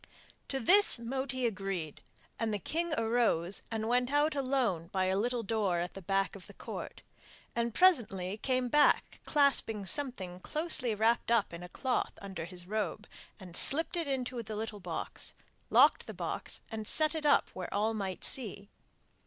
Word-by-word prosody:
To 270 - -2
this 395 - +7
Moti 260 +2 -3
agreed, 195 -8 -3 0.4
and 225 -1 0
the 210 - 0
king 335 - -2
arose 225 -6 +1
and 220 -1 -3
went 250 +2 +1
out 295 +2 +3
alone 255 - 0
by 190 0 0
a 190 0 +1
little 240 +3 0
door 200 -4 0
at 175 +1 -3
the 195 - -8
back 195 +2 0
of 195 - -11
the - - -14
Court, - - -7 0.5
and 235 0 0
presently 210 - +3
came 255 +2 0
back 295 +5 +3
clasping 265 -8 +2
something 190 -5 +1
closely 285 - 0
wrapped 225 +3 +2
up 230 -6 +2
in 170 - -7
a 180 - -9
cloth 255 +6 -2
under 195 -4 -6
his 175 0 -9
robe, 210 +1 -3 0.5
slipped 315 - +1
it 335 -3 -2
into 255 -3 -2
the 215 -1 -6
little 215 -1 -5
box, 175 -4 -4 0.3
locked - - +5
the - - -7
box, - - -4
and 220 -1 -5
set 310 0 +2
it 315 -1 -4
up 285 - +4
where 185 -1 -6
all 215 +2 +1
might 195 -4 -4
see. 205 -5 -1
225 Hz, 170 wpm, -32 LUFS, 195-260 Hz, 0.5 s, this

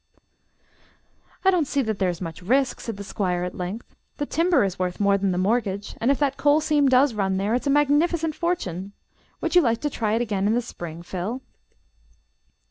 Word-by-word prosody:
"I 385 - +7
don't 340 -6 +1
see 280 -1 0
that 220 -3 -3
there 190 -2 +2
is 175 0 -5
much 165 -1 -6
risk," 255 +7 +1
said 225 -4 -6
the 200 - -6
Squire, 180 -3 -2
at 180 - -4
length. 185 +6 -6 0.2
"The 290 - -1
timber 335 - +2
is 190 -2 -2
worth 180 -1 -2
more 200 -1 +3
than 200 -1 0
the 180 - -1
mortgage; 200 0 -1
and 235 - +2
if 280 - +3
that 275 -2 0
coal 290 +1 +4
seam 295 -3 +2
does 260 0 +4
run 190 -3 0
there, 200 +3 0
it's 250 +4 -1
a - - +2
magnificent 300 +3 +2
fortune. 200 - -3 0.5
Would - - -2
you 355 - +8
like 230 -5 +1
to 295 - -1
try 215 -4 -1
it 230 - +1
again 205 -3 -1
in 220 - +2
the 245 - +2
spring, 170 -6 -8
Phil?" 195 +9 -4
225 Hz, 210 wpm, -24 LUFS, 190-285 Hz, 0.5 s, you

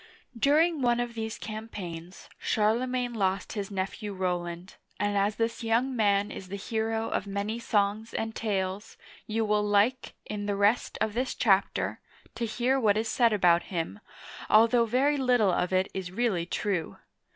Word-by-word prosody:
During 300 +6 +3
one 240 -1 +2
of 240 -1 -2
these 220 -1 -4
campaigns, 190 -6 -7
Charlemagne 245 +3 0
lost 195 -3 -1
his 200 -3 -4
nephew 200 +2 -4
Rowland, 180 -1 -3 0.2
and 205 0 0
as 200 +1 +1
this 230 0 -2
young 235 +4 +1
man 205 -2 +2
is 190 - -8
the 195 - -5
hero 225 +2 -2
of 200 - -2
many 200 +3 -3
songs 215 0 0
and 225 0 -3
tales, 195 -2 -3 0.3
you 220 +1 0
will 210 0 +2
like, 210 +5 +1
in 205 -1 -4
the 205 - 0
rest 205 +4 +2
of 220 -1 +1
this 250 +3 -1
chapter, 195 -4 +1 0.3
to 235 - -2
hear 245 +4 +1
what 210 -4 +3
is 220 +1 0
said 235 +1 +3
about 175 -4 +3
him, 175 +3 -3 0.5
although 230 +2 +5
very 275 +6 +2
little 245 -7 +3
of 180 +1 0
it 185 +1 +2
is 190 -2 -4
really 190 -5 0
true. 185 -4 -2
215 Hz, 160 wpm, -28 LUFS, 195-230 Hz, 0.5 s, although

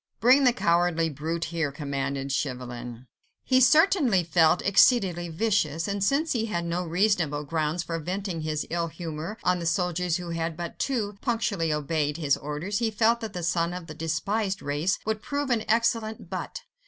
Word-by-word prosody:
"Bring 260 +4 +5
the 250 - +6
cowardly 170 -6 +1
brute 160 +4 -3
here," 160 -4 0
commanded 140 -1 -3
Chauvelin. 125 -3 -4 0.4
He 260 0 +3
certainly 295 - +4
felt 165 +1 +3
exceedingly 190 -4 +3
vicious, 165 -4 0
and 200 -1 -1
since 290 +9 +1
he 230 -2 0
had 170 -5 -2
no 170 +2 -1
reasonable 170 -4 +1
grounds 155 +2 -1
for 165 -1 -3
venting 180 +1 -4
his 155 -1 -2
ill 170 0 0
humour 165 +4 -6
on 180 0 +2
the 170 - -3
soldiers 180 0 0
who 175 -1 -6
had 165 -1 -3
but 170 -1 -6
too 210 -7 -2
punctually 225 - 0
obeyed 150 0 -1
his 145 -4 +2
orders, 150 +8 -3
he 230 -2 +1
felt 225 +2 +2
that 225 -2 -6
the 180 - -4
son 170 0 0
of 180 -2 -7
the 155 - -8
despised 190 +6 -2
race 145 +6 0
would 220 0 -1
prove 285 -2 -2
an 225 -3 +1
excellent 220 -4 0
butt. 185 - -5
175 Hz, 175 wpm, -26 LUFS, 155-215 Hz, 0.4 s, the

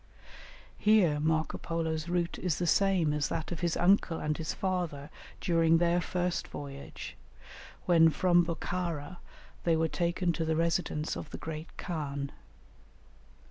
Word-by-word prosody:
Here 200 -9 +4
Marco 155 +1 0
Polo's 160 -1 -2
route 175 -1 -1
is 175 -5 0
the 175 - -1
same 180 -3 +3
as 150 -1 0
that 160 +1 -3
of 175 - -3
his 170 -2 0
uncle 175 -2 +3
and 150 0 -1
his 160 0 -3
father 170 -6 -2 0.3
during 165 -1 +3
their 175 +1 +2
first 180 0 -1
voyage, 140 -1 -8 0.7
when 165 -2 +6
from 175 +3 +4
Bokhara 170 -1 -3 0.5
they 165 -1 +3
were 160 0 +2
taken 170 +1 0
to 165 - -2
the 160 0 0
residence 165 -2 0
of 150 - -6
the - - -7
great 160 0 -7
khan. 140 -4 -4
165 Hz, 140 wpm, -30 LUFS, 155-175 Hz, 0.7 s, when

